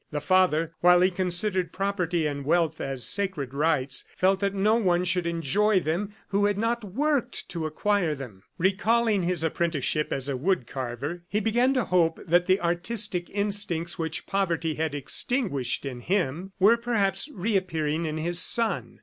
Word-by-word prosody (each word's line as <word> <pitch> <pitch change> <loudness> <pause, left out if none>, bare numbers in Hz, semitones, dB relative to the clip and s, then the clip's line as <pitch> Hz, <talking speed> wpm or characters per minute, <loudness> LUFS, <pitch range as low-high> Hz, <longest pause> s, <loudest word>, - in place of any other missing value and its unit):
The 150 - -3
father, 165 0 +2
while 180 0 +5
he 185 +1 +4
considered 185 0 +1
property 180 -4 -1
and 140 -1 -3
wealth 160 +1 +1
as 135 -2 -3
sacred 185 -10 -1
rights, 140 -2 0
felt 190 +1 +3
that 200 0 -1
no 205 +3 +3
one 180 -5 +1
should 175 -1 0
enjoy 185 +6 +2
them 185 +6 -3
who 200 +1 +2
had 205 -1 +1
not 230 +2 -1
worked 275 +7 -1
to 165 -3 -3
acquire 180 0 0
them. 120 -9 -10 0.2
Recalling 205 +3 +2
his 175 -2 -1
apprenticeship 160 -2 0
as 135 0 -2
a 140 - -1
wood 165 +1 0
carver, 130 +7 -5
he 210 - 0
began 240 +5 +2
to 250 -5 +1
hope 170 -3 +2
that 175 +1 +2
the 185 +1 +3
artistic 175 +2 0
instincts 200 -5 -1
which 160 -1 -3
poverty 170 -5 -1
had 155 -1 -2
extinguished 145 - -1
in 130 -3 -5
him 180 +3 -1
were, 210 +5 +6
perhaps, 225 - 0
reappearing 175 - -1
in 155 0 -3
his 170 +2 -1
son. 195 - 0
180 Hz, 165 wpm, -26 LUFS, 155-200 Hz, 0.2 s, were